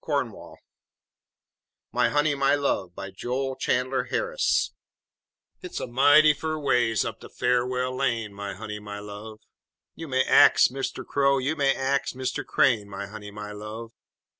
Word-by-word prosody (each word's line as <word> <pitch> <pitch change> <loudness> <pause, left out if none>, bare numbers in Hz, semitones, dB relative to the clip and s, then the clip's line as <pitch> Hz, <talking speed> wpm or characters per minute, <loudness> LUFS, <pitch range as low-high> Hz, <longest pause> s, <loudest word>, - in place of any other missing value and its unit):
] - - -26 1.9
MY - - +2
HONEY, 145 0 +2
MY 140 0 +2
LOVE 100 -11 -1
BY 95 - -7
JOEL 130 +6 -3
CHANDLER 130 +1 0
HARRIS - - 0 0.9
Hit's 360 -1 -6
a - - -3
mighty 145 +5 +5
fur 155 +1 -3
ways 120 -6 +1
up - - -5
de - - -12
Far'well 125 +1 0
Lane, 115 -6 -1
My 100 -1 -6
honey, 105 +1 -6
my 105 -1 -8
love! 105 +1 -9 0.5
You 165 - -8
may 130 -1 +2
ax - - +6
Mister 135 +1 -4
Crow, 140 -1 +2
you 135 +4 -1
may 140 -2 +2
ax 135 +1 -1
Mr. 130 -1 -3
Crane, 105 -5 +2
My 100 0 -6
honey, 105 0 -9
my 105 0 -8
love! 105 +2 -8
125 Hz, 150 wpm, -26 LUFS, 105-140 Hz, 1.9 s, ax